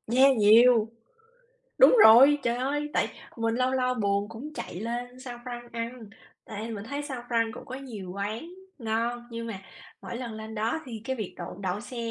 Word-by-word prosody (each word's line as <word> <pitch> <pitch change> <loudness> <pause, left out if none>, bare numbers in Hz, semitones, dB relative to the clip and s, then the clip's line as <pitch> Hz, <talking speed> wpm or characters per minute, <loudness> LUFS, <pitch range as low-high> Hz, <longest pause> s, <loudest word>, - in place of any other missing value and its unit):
yeah, 270 0 +6
nhiều. 225 +1 +6 0.9
Đúng - - +8
rồi, 270 +6 +8
trời 235 0 0
ơi! 290 +3 -2
Tại - - +1 0.3
mình 225 0 0
lâu 255 +1 +1
lâu 255 -1 +1
buồn 200 -2 0
cũng 255 +7 -8
chạy 175 - -6
lên 245 +2 -5
San 245 -2 -7
Franc 240 -1 -7
ăn, 230 -2 -6 0.3
tại 220 +2 -6
mình 205 -2 -6
thấy 285 +4 -4
San 270 -4 -5
Franc 230 -2 +1
cũng - - -10
có 255 - -7
nhiều 225 -9 -8
quán 215 +10 -4 0.3
ngon, 235 +1 -2
nhưng 230 0 -5
mà 210 -4 -5 0.4
mỗi 235 - -6
lần 240 -3 -5
lên 220 0 -8
đó 225 +9 -1
thì 225 -3 -7
cái 260 0 -2
việc 215 -5 -5
đậu 175 0 -6
đậu 190 +2 -2
xe 245 +1 -9
235 Hz, 195 wpm, -27 LUFS, 220-255 Hz, 0.9 s, Đúng